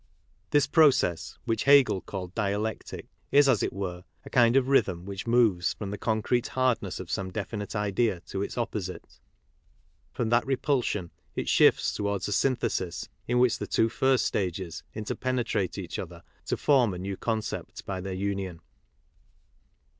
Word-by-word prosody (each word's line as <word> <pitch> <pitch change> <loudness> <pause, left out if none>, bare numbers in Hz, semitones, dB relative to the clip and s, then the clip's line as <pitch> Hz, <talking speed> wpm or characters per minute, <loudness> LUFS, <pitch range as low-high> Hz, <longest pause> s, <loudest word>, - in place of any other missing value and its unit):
This 145 -1 +4
process, 125 - +3
which 115 -3 -1
Hegel 140 -8 +6
called 90 -2 -6
dialectic, 105 0 -3 0.3
is, 145 0 +6
as 125 -6 +3
it - - 0
were, 90 -2 -5 0.2
a - - -10
kind 120 0 +4
of 135 -1 +4
rhythm 95 -10 +2
which 100 +2 -6
moves 115 -7 +3
from 100 -2 -5
the 105 - -4
concrete 115 +2 0
hardness 120 -7 0
of 95 - -7
some 95 -3 -2
definite 105 +3 -5
idea 105 -1 0
to 95 - -5
its 100 - -4
opposite; 105 -6 -4 0.9
from 115 -2 -2
that 120 +1 +3
repulsion 125 - -1 0.2
it - - -3
shifts - - +4
towards 100 -1 -2
a - - -4
synthesis 115 -9 -1 0.2
in 120 - +1
which 125 -1 +3
the - - -4
two 115 - +2
first 130 +2 +2
stages 90 -3 -2
interpenetrate 115 -2 -2
each - - -5
other - - -8 0.2
to - - 0
form 125 -9 +3
a - - -5
new 95 +2 -4
concept 110 +1 -4
by 95 -1 -4
their 95 +1 -5
union. 95 -2 -3
105 Hz, 155 wpm, -28 LUFS, 95-125 Hz, 0.9 s, Hegel